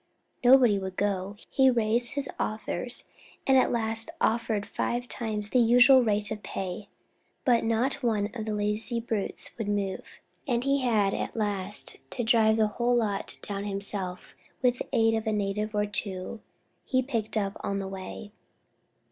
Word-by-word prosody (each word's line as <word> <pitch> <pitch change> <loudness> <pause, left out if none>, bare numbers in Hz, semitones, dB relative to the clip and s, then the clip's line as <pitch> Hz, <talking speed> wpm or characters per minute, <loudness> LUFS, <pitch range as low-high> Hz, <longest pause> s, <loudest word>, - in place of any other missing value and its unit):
Nobody 245 -5 +6
would 190 -1 -5
go; 200 -1 -1
he 265 -1 +4
raised 235 0 +2
his 280 -1 +2
offers, 220 +3 -2 0.4
and 270 - +4
at 260 - +4
last 225 -1 +1
offered 220 -2 +1
five 245 +1 -2
times 215 -4 -3
the 255 - +4
usual 245 +3 +7
rate 210 -2 0
of 215 -1 -4
pay, 190 +1 -5 0.6
but 240 -4 +4
not 235 +5 0
one 215 -4 0
of 220 -3 -5
the 215 -1 -2
lazy 210 +3 -1
brutes 225 -4 -3
would 220 - -2
move, 200 -2 -3 0.3
and 240 -1 +1
he 275 0 +2
had 215 -6 +2
at - - -3
last 205 -2 -3
to 245 - -3
drive 220 -1 +4
the 220 - +4
whole 240 +3 0
lot 210 -4 -1
down 200 0 -4
himself, 195 -2 -5 0.3
with 250 0 +3
the - - -4
aid 225 -3 +3
of 220 0 -1
a - - +2
native 210 +1 -1
or 210 0 +2
two 205 +1 -4 0.4
he 260 -1 +1
picked 230 -5 -2
up 200 -2 -1
on 200 - -2
the 195 -1 -3
way. 190 +2 -7
220 Hz, 165 wpm, -28 LUFS, 205-240 Hz, 0.6 s, usual